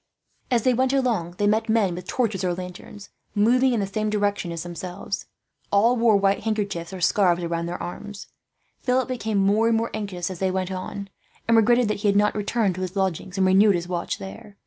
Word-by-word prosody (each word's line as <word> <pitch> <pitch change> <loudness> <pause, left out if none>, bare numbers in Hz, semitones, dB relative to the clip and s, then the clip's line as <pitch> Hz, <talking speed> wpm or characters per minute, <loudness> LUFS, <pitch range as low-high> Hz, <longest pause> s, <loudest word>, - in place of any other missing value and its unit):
As 240 -4 +2
they 255 - +3
went 260 +2 +1
along, 225 -11 0
they 205 - +1
met 220 +2 +1
men 215 -5 +2
with 180 +1 -7
torches 220 -7 -1
or 180 -1 0
lanterns, 185 +3 -9 0.3
moving 250 +5 +4
in 235 - +1
the 200 - 0
same 215 +2 -2
direction 205 -3 -1
as 165 -1 -4
themselves. 175 +3 -6 0.4
All 225 +5 +4
wore 230 -3 +4
white 195 0 +2
handkerchiefs 200 -6 -2
or 190 -1 -7
scarves 180 -2 +3
round 170 0 -2
their 175 - -4
arms. 205 +3 -7 0.5
Philip 255 0 +1
became 220 -5 -2
more 205 +3 +3
and 230 -1 +3
more 230 +1 -2
anxious 190 -4 -4
as 180 - -7
they 190 - +1
went 185 0 -2
on, 190 +2 -5 0.4
and 230 - +4
regretted 235 +2 +4
that 215 - 0
he 205 - 0
had 200 0 +3
not 210 0 +3
returned 210 -1 0
to 185 - -6
his 185 +1 -4
lodgings 190 -1 -2
and 190 - +3
renewed 195 +2 +5
his 175 0 -3
watch 175 -1 -3
there. 205 +1 -10
200 Hz, 215 wpm, -24 LUFS, 185-220 Hz, 0.5 s, renewed